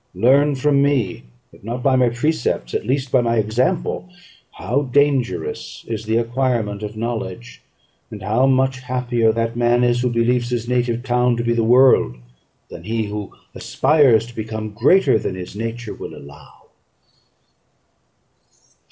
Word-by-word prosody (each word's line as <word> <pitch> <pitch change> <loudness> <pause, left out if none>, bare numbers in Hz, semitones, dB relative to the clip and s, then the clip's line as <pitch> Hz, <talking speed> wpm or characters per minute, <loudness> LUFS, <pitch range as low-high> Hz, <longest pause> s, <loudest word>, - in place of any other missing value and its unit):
Learn 135 +8 +3
from 140 +1 +2
me, 130 - 0 0.3
if - - -19
not 120 +3 -5
by 135 -2 +3
my 125 -2 +3
precepts, 120 - -2
at - - -3
least 130 0 -1
by 130 - +4
my 115 -1 0
example, 125 - -1 0.4
how 120 +9 -1
dangerous 140 -2 -1
is 110 -2 -5
the 110 +1 +1
acquirement 115 -3 -1
of 105 0 -6
knowledge, 115 -1 -5 0.5
and 105 -3 -9
how 115 +6 +2
much 130 0 +1
happier 125 -3 0
that 115 +1 -2
man 120 +1 +2
is 120 0 +2
who 125 - +1
believes 120 +1 0
his 120 -1 -3
native 120 -1 -1
town 125 -1 +1
to 120 - -2
be 120 0 +1
the 115 -1 0
world, 125 - +4 0.6
than - - -10
he 115 0 -1
who 105 -1 -6 0.2
aspires 135 -8 +3
to 120 0 -14
become 110 -1 -5
greater 135 - +3
than 95 - -4
his 90 +1 -8
nature 115 +1 -5
will - - -9
allow. 70 0 -15
120 Hz, 150 wpm, -20 LUFS, 110-130 Hz, 0.6 s, by